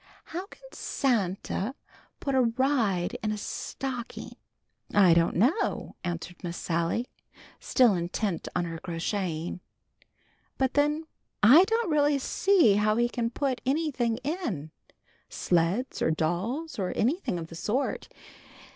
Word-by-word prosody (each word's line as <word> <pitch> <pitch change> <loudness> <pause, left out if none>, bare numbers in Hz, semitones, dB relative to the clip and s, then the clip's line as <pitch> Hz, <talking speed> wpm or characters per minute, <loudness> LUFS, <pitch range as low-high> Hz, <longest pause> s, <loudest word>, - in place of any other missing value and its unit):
"How 360 +4 -6
can 455 - -17
Santa 215 -1 -1 0.4
put 275 - -2
a 260 - +4
ride 235 -4 +1
in 215 - -1
a 215 - -2
stocking?" 250 +3 -5 0.6
"I 190 -4 +7
don't 165 0 +3
know," 255 - +1
answered 175 0 -5
Miss 170 -1 -4
Sally, 170 +7 -1 0.5
still 245 -5 +4
intent 180 +1 -2
on 180 -1 +1
her 165 -1 -5
crocheting. 170 0 -3 1.0
"But 265 -1 +1
then 295 +2 +2 0.4
I 290 - +9
don't 450 -3 0
really 290 -1 +3
see 320 - +3
how 215 +1 +3
he 240 +1 +2
can 235 -1 -1
put 260 +1 -2
anything 265 -5 0
in; 255 - -3 0.6
sleds 180 +9 0
or - - +3
dolls 190 - -2
or 185 -2 0
anything 255 - 0
of 165 -1 -6
the 165 - -9
sort. 220 +10 -2
230 Hz, 130 wpm, -28 LUFS, 175-275 Hz, 1.0 s, I